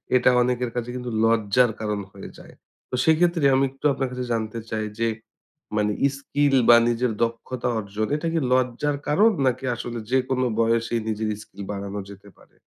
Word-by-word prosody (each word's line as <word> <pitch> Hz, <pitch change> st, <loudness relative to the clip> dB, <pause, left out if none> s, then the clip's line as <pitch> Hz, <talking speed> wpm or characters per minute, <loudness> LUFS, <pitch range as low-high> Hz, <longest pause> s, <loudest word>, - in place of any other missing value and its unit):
এটা 125 Hz, -, +5 dB
অনেকের 125 Hz, -1 st, 0 dB
কাছে 120 Hz, 0 st, -3 dB
কিন্তু 125 Hz, -1 st, -5 dB
লজ্জার 115 Hz, +1 st, +3 dB
কারণ 105 Hz, -1 st, -2 dB
হয়ে 100 Hz, -, -9 dB
যায়। -, -, -14 dB, 0.4 s
তো -, -, -3 dB
সেক্ষেত্রে 165 Hz, -1 st, +3 dB
আমি 135 Hz, -, +3 dB
একটু 135 Hz, +2 st, -12 dB
আপনার 135 Hz, -1 st, -2 dB
কাছে 125 Hz, 0 st, -4 dB
জানতে 110 Hz, 0 st, -3 dB
চাই 110 Hz, -1 st, -2 dB
যে 115 Hz, -, +2 dB, 0.7 s
মানে 105 Hz, 0 st, +1 dB, 0.3 s
স্কিল 140 Hz, 0 st, +1 dB
বা 120 Hz, -, +10 dB
নিজের 120 Hz, 0 st, 0 dB
দক্ষতা 115 Hz, +2 st, -3 dB
অর্জন 105 Hz, +1 st, -3 dB
এটা 165 Hz, +2 st, -2 dB
কি 165 Hz, -, +2 dB
লজ্জার 130 Hz, +3 st, +1 dB
কারণ 210 Hz, +9 st, +5 dB, 0.2 s
নাকি 130 Hz, +1 st, -1 dB
আসলে 120 Hz, 0 st, -5 dB
যেকোনো 130 Hz, 0 st, +1 dB
বয়সেই 115 Hz, 0 st, +1 dB
নিজের 110 Hz, 0 st, -2 dB
স্কিল 100 Hz, -1 st, -10 dB
বাড়ানো 100 Hz, 0 st, -5 dB
যেতে 100 Hz, +1 st, -14 dB
পারে? -, -, -23 dB
120 Hz, 170 wpm, -24 LUFS, 110-130 Hz, 0.7 s, বা